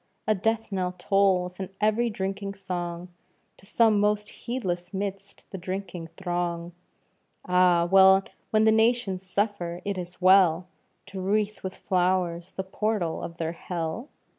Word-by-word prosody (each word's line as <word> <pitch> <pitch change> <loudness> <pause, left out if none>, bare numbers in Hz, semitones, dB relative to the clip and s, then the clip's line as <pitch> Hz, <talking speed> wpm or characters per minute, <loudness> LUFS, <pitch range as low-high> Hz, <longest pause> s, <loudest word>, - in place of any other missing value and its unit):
A 215 - +3
death 225 +2 -1
knell 185 -2 -1
tolls 185 -1 +1
in 190 -1 -4
every 215 +3 +2
drinking 195 -1 -4
song, 175 -2 -5 0.5
To 195 - -19
some 220 -1 +4
most 210 0 +1
heedless 180 -7 -4
'midst 195 0 -5
the 190 - -6
drinking 185 -2 -5
throng. 175 -2 -2 0.7
Ah! 180 -1 +4 0.6
when 215 0 +3
the 220 - +5
nations 220 -4 +2
suffer, 185 -3 -2
is 180 -3 -4
it - - -29
well 185 -2 +5 0.4
To 195 -1 -7
wreath 210 +2 0
with 190 -1 -5
flowers 180 -2 0
the 190 - -3
portal 190 -3 -2
of 170 - -7
their 165 -1 -2
hell? 170 - -5
190 Hz, 140 wpm, -26 LUFS, 175-205 Hz, 0.7 s, the